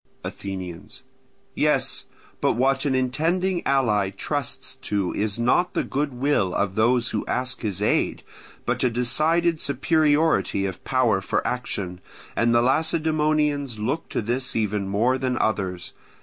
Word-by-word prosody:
Athenians. 95 Hz, -3 st, -7 dB, 0.5 s
Yes, -, -, +1 dB, 0.4 s
but -, -, +3 dB
what 135 Hz, +3 st, +1 dB
an 135 Hz, -2 st, +1 dB
intending 165 Hz, +8 st, 0 dB
ally 110 Hz, -8 st, +2 dB
trusts 95 Hz, -, -3 dB
to 100 Hz, -3 st, -2 dB
is 105 Hz, 0 st, -1 dB
not 150 Hz, +10 st, +2 dB
the -, -, +1 dB
goodwill 135 Hz, -8 st, 0 dB
of 100 Hz, -1 st, 0 dB
those 120 Hz, +3 st, +2 dB
who -, -, -1 dB
ask 130 Hz, +1 st, -2 dB
his 105 Hz, -3 st, -2 dB
aid, -, -, +1 dB, 0.4 s
but -, -, 0 dB
a 125 Hz, -, +4 dB
decided 155 Hz, +8 st, +1 dB
superiority 145 Hz, -, +2 dB
of 95 Hz, -2 st, -5 dB
power 120 Hz, -7 st, +2 dB
for -, -, -1 dB
action; 95 Hz, -7 st, -3 dB, 0.3 s
and 115 Hz, 0 st, +2 dB
the 120 Hz, 0 st, +4 dB
Lacedaemonians 150 Hz, -2 st, +1 dB
look 130 Hz, +10 st, -2 dB
to -, -, -2 dB
this 125 Hz, +4 st, -2 dB
even 105 Hz, -3 st, 0 dB
more 115 Hz, +7 st, +1 dB
than 130 Hz, -2 st, -1 dB
others. 95 Hz, -6 st, -1 dB
125 Hz, 135 wpm, -24 LUFS, 105-145 Hz, 0.5 s, a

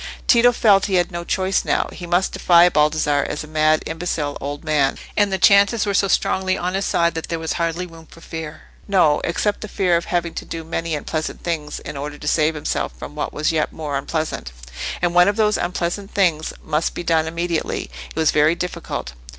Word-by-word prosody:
Tito 245 Hz, 0 st, +6 dB
felt 205 Hz, -4 st, +4 dB
he 195 Hz, -, 0 dB
had 175 Hz, +1 st, +2 dB
no 170 Hz, 0 st, -4 dB
choice 190 Hz, +2 st, 0 dB
now: -, -, 0 dB
he 175 Hz, -, -8 dB
must 175 Hz, +2 st, +1 dB
defy 175 Hz, 0 st, +5 dB
Baldassarre 150 Hz, -2 st, +2 dB
as 150 Hz, -, -4 dB
a -, -, -10 dB
mad, 155 Hz, 0 st, +2 dB
imbecile 160 Hz, -3 st, -3 dB
old 145 Hz, +2 st, -5 dB
man; 150 Hz, -3 st, +1 dB, 0.2 s
and 205 Hz, -2 st, +2 dB
the 190 Hz, -, +1 dB
chances 200 Hz, +3 st, +5 dB
were 200 Hz, -, -1 dB
so 195 Hz, 0 st, +3 dB
strongly 185 Hz, 0 st, +1 dB
on 180 Hz, +1 st, -2 dB
his 195 Hz, +1 st, -1 dB
side 170 Hz, 0 st, +2 dB
that 160 Hz, -1 st, -5 dB
there 165 Hz, -, -1 dB
was 160 Hz, 0 st, -3 dB
hardly 170 Hz, +1 st, -1 dB
room 165 Hz, -2 st, -14 dB
for -, -, -16 dB
fear. 160 Hz, -2 st, -7 dB, 0.2 s
No; 175 Hz, -7 st, +3 dB
except 205 Hz, +5 st, -1 dB
the 215 Hz, -, -5 dB
fear 185 Hz, -4 st, +1 dB
of 170 Hz, -, 0 dB
having 175 Hz, -2 st, -1 dB
to -, -, -5 dB
do 165 Hz, -1 st, -6 dB
many 165 Hz, 0 st, -3 dB
unpleasant 155 Hz, +1 st, -4 dB
things 155 Hz, -3 st, -3 dB
in 145 Hz, -, -7 dB
order 145 Hz, +1 st, -5 dB
to 150 Hz, -, -8 dB
save 155 Hz, +1 st, +2 dB
himself 150 Hz, -, -2 dB
from -, -, -8 dB
what -, -, -3 dB
was 150 Hz, +2 st, 0 dB
yet 155 Hz, -2 st, 0 dB
more 150 Hz, -3 st, -4 dB
unpleasant. 155 Hz, -, -3 dB, 0.5 s
And 175 Hz, -1 st, +2 dB
one 180 Hz, +1 st, +6 dB
of 205 Hz, -, +2 dB
those 210 Hz, -1 st, +2 dB
unpleasant 180 Hz, +3 st, -2 dB
things 165 Hz, -6 st, +1 dB
must 155 Hz, +1 st, -1 dB
be -, -, -4 dB
done 160 Hz, -1 st, +2 dB
immediately: 170 Hz, -, -2 dB, 0.2 s
it -, -, -14 dB
was 160 Hz, -1 st, +3 dB
very 155 Hz, +2 st, +3 dB
difficult. 175 Hz, -, -5 dB
170 Hz, 215 wpm, -21 LUFS, 155-185 Hz, 0.5 s, Tito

